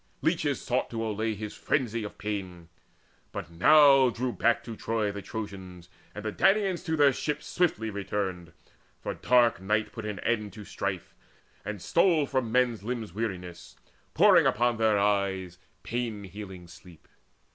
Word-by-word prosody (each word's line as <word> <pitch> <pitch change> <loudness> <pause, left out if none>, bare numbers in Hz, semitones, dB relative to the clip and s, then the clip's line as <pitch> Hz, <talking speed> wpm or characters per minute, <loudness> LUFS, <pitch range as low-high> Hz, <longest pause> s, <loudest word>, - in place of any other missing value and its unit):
Leeches - - +1
sought - - -1
to 115 -1 -3
allay 110 0 -2
His 105 +1 -6
frenzy 120 -5 -1
of 105 - -8
pain. 95 -5 -5 0.6
But 85 - -6
now 135 - +6
drew 125 +2 -2
back 120 0 +1
to 115 -1 -7
Troy 110 -2 -1
The 100 0 -6
Trojans, 95 -4 -8 0.3
and 105 0 -7
the 110 - -1
Danaans 195 - +2
to 160 -1 -1
their 145 -2 +5
ships 150 +3 -3
Swiftly 115 -11 0
returned, 95 -4 -3 0.5
for - - -4
dark 120 -5 +3
night 105 +3 0
put 110 -2 -6
an 105 -2 -4
end 105 -4 -1
To 105 0 -10
strife, 95 -3 -4 0.5
and 105 0 -5
stole 165 - +3
from 130 -4 -1
men's 125 -3 +2
limbs 110 -3 -4
weariness, 90 -5 -5 0.4
Pouring - - +6
upon 120 +1 +1
their 110 -2 +3
eyes 100 -3 0 0.2
pain 115 -4 -3
healing 95 -2 -9
sleep. 85 0 -16
105 Hz, 155 wpm, -28 LUFS, 95-120 Hz, 0.6 s, now